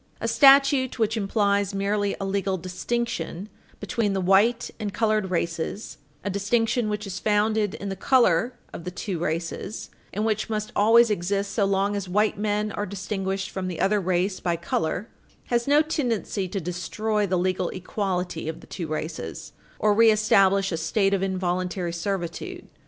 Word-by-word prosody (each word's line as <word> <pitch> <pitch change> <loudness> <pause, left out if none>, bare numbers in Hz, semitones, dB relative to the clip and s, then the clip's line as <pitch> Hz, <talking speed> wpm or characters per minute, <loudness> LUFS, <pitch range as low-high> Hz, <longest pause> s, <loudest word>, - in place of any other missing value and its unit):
A - - -2
statute 275 -2 +5
which 220 -1 +1
implies 200 -1 +1
merely 200 0 0
a 195 - -3
legal 195 -1 -1
distinction 185 0 -3 0.3
between 210 -4 -1
the 195 - 0
white 200 +6 +3
and 210 -2 -3
colored 215 -2 +1
races 170 +3 -3 0.2
a 200 - -2
distinction 225 +3 +1
which 210 0 -3
is 195 0 -5
founded 210 0 +1
in 200 - -5
the 195 - -3
color 235 0 +3 0.2
of - - -7
the 180 - -4
two 180 0 -4
races 165 +5 -4 0.2
and 210 +3 -2
which 215 0 0
must 215 -1 -2
always 225 +2 +5
exist 200 +1 -1
so 205 -3 +2
long 195 +1 +1
as 195 -2 -4
white 210 +3 +2
men 210 +1 -1
are 205 +1 -3
distinguished 195 0 -3
from 190 -1 -3
the 175 -3 -5
other 205 +1 +2
race 185 +1 0
by 175 -2 0
color 170 +3 -2 0.5
has 235 +1 +1
no 295 +2 +5
tendency 240 - -1
to 195 +2 -3
destroy 205 +5 -2
the 185 0 +1
legal 185 0 0
equality 180 -3 -3
of 160 - -6
the - - -14
two 170 -4 -5
races, 155 - -5 0.3
or 210 -1 +3
reestablish 205 -3 +4
a 165 - -1
state 195 +5 +1
of 195 - +1
involuntary 185 -2 -1
servitude. 175 0 -4
200 Hz, 165 wpm, -25 LUFS, 185-215 Hz, 0.5 s, statute